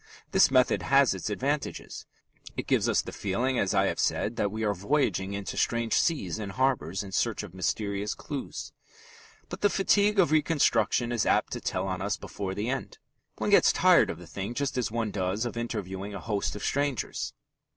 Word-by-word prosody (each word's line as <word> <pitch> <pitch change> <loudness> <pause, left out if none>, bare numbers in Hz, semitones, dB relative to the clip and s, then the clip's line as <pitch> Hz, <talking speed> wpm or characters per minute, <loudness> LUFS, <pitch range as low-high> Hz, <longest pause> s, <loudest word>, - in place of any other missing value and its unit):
This 190 -1 +5
method 130 -1 +3
has 135 -4 +4
its 95 +2 -4
advantages. 140 +7 -3 0.5
It - - -3
gives - - +2
us - - +2
the - - -7
feeling, 120 +6 -1
as 100 +1 +1
I 95 0 +4
have - - -1
said, 110 - 0
that 105 - 0
we 110 +1 -3
are 105 -1 +2
voyaging 100 - 0
into 100 -1 -5
strange 115 -1 0
seas 110 - +1
and 100 -3 -5
harbours 105 - 0
in 100 - -9
search 110 +2 0
of 100 -4 -10
mysterious 100 +3 -2
clues. 145 -3 -6 0.7
But - - -8
the 205 - +4
fatigue 200 +2 +3
of 175 -6 +4
reconstruction 135 -7 +2
is 120 -2 0
apt - - +2
to - - -4
tell 95 +1 -2
on 95 -1 -3
us 100 0 -1
before 95 -2 -5
the 105 +3 -2
end. 135 +2 -3 0.4
One - - -1
gets - - +6
tired - - +5
of - - -4
the - - -11
thing 100 +5 -5
just 140 0 -1
as 125 -3 0
one 115 -1 -2
does 95 +3 -1
of 120 - -4
interviewing 100 -4 -4
a - - -5
host 105 0 -2
of 105 - -7
strangers. 140 -5 -1
110 Hz, 195 wpm, -28 LUFS, 100-130 Hz, 0.7 s, gets